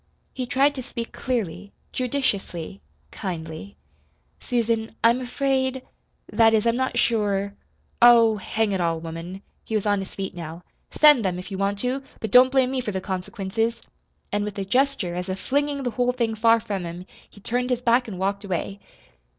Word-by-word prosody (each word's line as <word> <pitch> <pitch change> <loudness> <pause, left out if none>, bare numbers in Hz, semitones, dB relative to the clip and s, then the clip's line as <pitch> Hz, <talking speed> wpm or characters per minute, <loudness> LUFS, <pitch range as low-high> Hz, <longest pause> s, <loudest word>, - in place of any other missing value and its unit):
He 255 -2 -4
tried 275 +3 +3
to 265 - -5
speak 235 -1 -6
clearly, 205 -6 -3 0.2
judiciously, 205 - -2 0.3
kindly. 165 +1 -6 0.6
"Susan, 230 -2 -1
I'm 235 +3 +4
afraid 260 0 -1 0.5
that 225 -1 +5
is, 215 - +1
I'm 230 0 +3
not 260 +1 -1
sure 200 -3 +1 0.5
Oh, 230 -2 +7
hang 215 +2 -1
it 190 -2 0
all, 165 -1 0
woman" 165 +4 -7 0.2
he 220 - -4
was 215 - 0
on 205 -1 +2
his 195 - -7
feet 195 -1 -4
now 170 0 -8 0.3
"send 295 -6 +6
them, 185 -2 -1
if 180 +2 -8
you 190 - -4
want 200 +1 0
to 260 +2 -1 0.2
but 220 - -4
don't 255 +1 +7
blame 260 -1 +3
me 265 -1 -1
for 225 - -4
the 190 - -2
consequences." 195 +4 -2 0.5
And 205 0 0
with 205 0 -5
a 195 - -2
gesture, 250 -4 +1
as 180 +2 -4
of 185 +1 -3
flinging 285 0 -1
the 245 - -1
whole 250 +2 +1
thing 235 -3 0
far 230 +1 +4
from 200 -3 -4
him, 175 +1 -7 0.2
he - - -17
turned 245 +4 -1
his 250 -1 0
back 245 +1 +3
and 200 -4 -6
walked 200 +2 -1
away. 195 +1 -3
220 Hz, 185 wpm, -24 LUFS, 190-250 Hz, 0.6 s, Oh